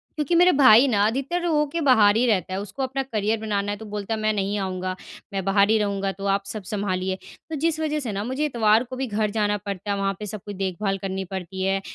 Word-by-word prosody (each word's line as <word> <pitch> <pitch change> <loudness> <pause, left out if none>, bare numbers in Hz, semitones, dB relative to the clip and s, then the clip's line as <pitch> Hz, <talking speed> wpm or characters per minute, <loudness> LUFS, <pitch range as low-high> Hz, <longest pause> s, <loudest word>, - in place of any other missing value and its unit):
क्योंकि 305 +1 0
मेरे 355 +2 +6
भाई 260 -3 +7
ना 205 -5 +2
अधिकतर 275 +10 -2
हो 300 -3 +2
के 335 +4 -3
बाहर 220 -8 +5
ही 235 +3 +3
रहता 190 -5 +1
है। 190 - -2
उसको 205 +7 -5
अपना 265 +1 -2
करियर 220 -3 -1
बनाना 205 -2 -1
है, 205 - -4
तो 220 - -10
बोलता 210 +1 -4
है 220 - -2
मैं 215 0 +1
नहीं 200 0 -1
आऊँगा, 185 -1 -3 0.4
मैं 195 -1 -2
बाहर 200 +1 +3
ही 220 - +4
रहूँगा 200 -2 -1
तो 195 +1 -8
आप 200 0 +1
सब 205 +1 -6
सँभालिए। 190 -2 -2 0.3
तो 320 - -3
जिस 315 +2 0
वज़ह 305 -1 -1
से 250 -6 -4
ना 200 0 -3
मुझे 260 +6 -1
इतवार 225 -5 +3
को 255 +1 -8
भी 265 0 -3
घर 210 -1 0
जाना 205 -1 0
पड़ता 200 0 -5
है, 200 - 0
वहाँ 195 0 0
पे 210 - -5
सब 210 0 -6
कोई 205 - -6
देखभाल 195 +1 -2
करनी 190 0 -4
पड़ती 190 0 -5
है। 195 0 +1
210 Hz, 255 wpm, -24 LUFS, 195-255 Hz, 0.4 s, भाई